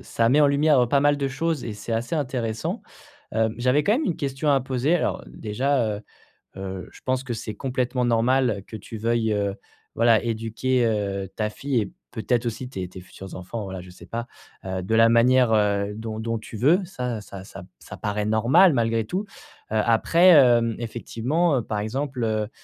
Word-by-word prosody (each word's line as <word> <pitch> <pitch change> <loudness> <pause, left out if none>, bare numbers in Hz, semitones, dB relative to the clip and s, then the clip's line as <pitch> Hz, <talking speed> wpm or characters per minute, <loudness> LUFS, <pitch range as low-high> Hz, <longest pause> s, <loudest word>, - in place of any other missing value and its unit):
ça 115 0 0
met 150 +5 +5
en - - +6
lumière, 145 +1 +3
heu, 120 - +2
pas 140 +4 +2
mal 145 +1 +3
de 140 -1 -1
choses 155 +2 -2
et 115 - -4
c'est 105 +2 -6
assez 120 +6 -1
intéressant, 130 - -2 0.5
heu, 110 0 +2
j'avais 125 +4 +2
quand 205 - +2
même 290 +6 +1
une 170 - -1
question 140 +2 -1
à 140 -1 +4
poser. 130 +4 0
Alors 175 - -1
déjà, 115 0 -1
heu - - -8 0.6
heu, 95 -1 -6
je - - -16
pense 130 0 0
que 125 -2 -4
c'est 110 -1 -6
complètement 125 -1 -1
normal 120 -2 +2
que 110 - -8
tu 110 +3 -9
veuilles, 115 0 0
heu, 100 -1 -1 0.4
voilà, 115 -1 +4
éduquer, 115 +2 0
heu, 100 -3 -1
ta 105 -1 -1
fille 135 +1 -1
et 100 - -7 0.2
peut-être, 115 +2 -1
aussi, 125 +2 -4
tes 95 -7 -5
tes 95 0 -11
futurs 95 +1 -11
enfants, 100 +5 -6
voilà, 95 -2 -6
je 90 - -13
sais 90 - -14
pas, 115 +1 -4 0.4
heu, 95 -1 -3
de 105 +5 -1
la 115 0 +6
manière, 120 +1 +4
heu, 105 -1 +2
dont 110 0 -6
dont 115 0 -2
tu 110 +1 -10
veux. 155 - +4
Ça 125 - -4
ça 100 -2 -10
ça, 95 -2 -10
ça - - -11
paraît 105 0 -2
normal, 120 - +5
malgré 115 -3 +1
tout, 190 - -3 0.4
heu, 110 - -3
après, 165 +10 +4
hem, 120 -8 +6
effectivement, 125 +5 -1
par 105 -1 -3
exemple, 130 +4 -3
heu 110 -1 -1
115 Hz, 200 wpm, -24 LUFS, 110-135 Hz, 0.6 s, en